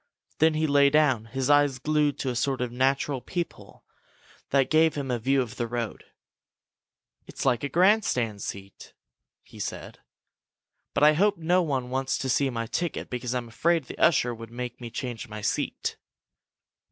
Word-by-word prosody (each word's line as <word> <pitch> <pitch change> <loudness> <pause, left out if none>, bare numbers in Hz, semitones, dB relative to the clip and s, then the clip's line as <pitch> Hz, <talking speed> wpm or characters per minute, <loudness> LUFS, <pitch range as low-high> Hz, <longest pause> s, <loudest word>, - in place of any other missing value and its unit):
Then 160 0 +4
he 155 +1 +1
lay 140 -1 +5
down, 140 -7 +3
his 130 +3 -3
eyes 145 -2 +4
glued 150 +1 +1
to 130 - -2
a - - -5
sort 130 +2 0
of 125 -1 -2
natural 135 +1 0
peephole 175 +3 -6 0.6
that 135 -1 +2
gave 160 0 +4
him 140 -3 -3
a 120 - -1
view 135 +3 +2
of 115 - -10
the 120 - -2
road. 120 -1 -4 1.2
"It's - - -6
like 125 -2 +2
a 140 - -1
grandstand 170 - +2
seat!" 100 0 -8 0.5
he - - -15
said. - - -6 1.0
"But - - +2
I 150 +1 +7
hope 200 +5 +2
no 175 +3 +2
one 135 -6 -2
wants 135 0 -1
to 135 - -3
see 135 +2 +2
my 115 -2 -3
ticket 170 +9 -3
because 125 0 -3
I'm 120 -2 -3
afraid 165 +8 +1
the - - -10
usher 130 -7 +3
would 115 -1 -9
make 125 +1 -6
me 120 - -6
change 120 -1 -5
my 105 0 -7
seat!" 105 - -2
135 Hz, 175 wpm, -26 LUFS, 120-150 Hz, 1.2 s, I